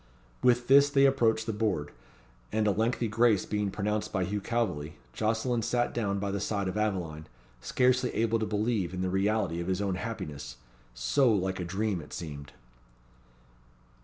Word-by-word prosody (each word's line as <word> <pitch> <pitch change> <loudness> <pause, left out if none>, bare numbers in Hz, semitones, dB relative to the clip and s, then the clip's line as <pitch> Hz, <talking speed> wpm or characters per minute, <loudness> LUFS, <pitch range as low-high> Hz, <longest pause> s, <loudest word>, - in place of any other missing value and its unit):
With 120 -1 +3
this 140 +1 +7
they 140 -1 +4
approached 115 -5 +3
the 110 - -2
board; 100 -9 -1 0.6
and, 110 0 +1
a 105 - +4
lengthy 115 +4 0
grace 110 -1 +3
being 105 -1 -1
pronounced 105 +2 -2
by 95 -3 0
Hugh 100 +3 -2
Calveley, 90 -11 -2 0.2
Jocelyn 115 +2 0
sat 120 +2 0
down 100 -4 -1
by 100 0 -2
the 100 - -2
side 100 -1 -1
of 95 - -3
Aveline, 90 -8 -2 0.3
scarcely 125 0 +2
able 115 0 +1
to 110 - -1
believe 105 -4 -1
in 90 - -3
the 95 0 -1
reality 95 -2 0
of 85 - -5
his 95 0 0
own 100 -2 0
happiness 75 - -6 0.4
so 90 - +3
like 95 -2 0
a - - -2
dream 95 +1 -1
it 75 - -12
seemed. 70 -4 -7
105 Hz, 170 wpm, -29 LUFS, 95-115 Hz, 0.6 s, this